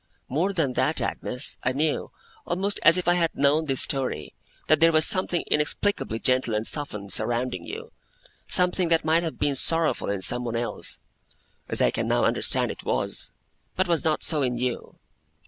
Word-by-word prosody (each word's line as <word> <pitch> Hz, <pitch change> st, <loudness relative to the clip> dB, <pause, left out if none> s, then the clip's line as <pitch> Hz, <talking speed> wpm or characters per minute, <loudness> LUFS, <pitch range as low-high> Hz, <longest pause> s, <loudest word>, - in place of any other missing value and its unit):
'More 165 Hz, +9 st, 0 dB
than 160 Hz, -9 st, 0 dB
that, -, -, 0 dB
Agnes, 125 Hz, +3 st, -1 dB
I 130 Hz, -, 0 dB
knew, 150 Hz, +3 st, -1 dB, 0.4 s
almost 195 Hz, +4 st, -1 dB
as 165 Hz, +3 st, +6 dB
if 180 Hz, -, -2 dB
I 175 Hz, -, +5 dB
had 170 Hz, -2 st, 0 dB
known 145 Hz, +3 st, +2 dB
this 135 Hz, -3 st, +1 dB
story, 130 Hz, -, -2 dB, 0.3 s
that 155 Hz, 0 st, +3 dB
there 165 Hz, +1 st, +5 dB
was 155 Hz, -1 st, +5 dB
something 180 Hz, -2 st, +1 dB
inexplicably 150 Hz, -, 0 dB
gentle 130 Hz, -2 st, 0 dB
and 105 Hz, +1 st, -1 dB
softened, 105 Hz, -10 st, -2 dB
surrounding 120 Hz, +3 st, -1 dB
you; 455 Hz, +3 st, -8 dB, 0.6 s
something 180 Hz, 0 st, +1 dB
that 165 Hz, -1 st, +1 dB
might 160 Hz, +1 st, +3 dB
have 165 Hz, -2 st, -4 dB
been 145 Hz, -, 0 dB
sorrowful 160 Hz, -3 st, +1 dB
in 100 Hz, -2 st, -2 dB
someone 125 Hz, -1 st, +2 dB
else 120 Hz, +1 st, -2 dB, 0.7 s
(as -, -, +1 dB
I -, -, +3 dB
can -, -, -2 dB
now -, -, +2 dB
understand -, -, +1 dB
it -, -, -10 dB
was), -, -, -2 dB, 0.4 s
but 185 Hz, -, +1 dB
was 170 Hz, -2 st, +1 dB
not 155 Hz, -2 st, 0 dB
so 155 Hz, -3 st, +2 dB
in 125 Hz, -2 st, -1 dB
you. 125 Hz, 0 st, -4 dB
150 Hz, 180 wpm, -25 LUFS, 125-170 Hz, 0.7 s, as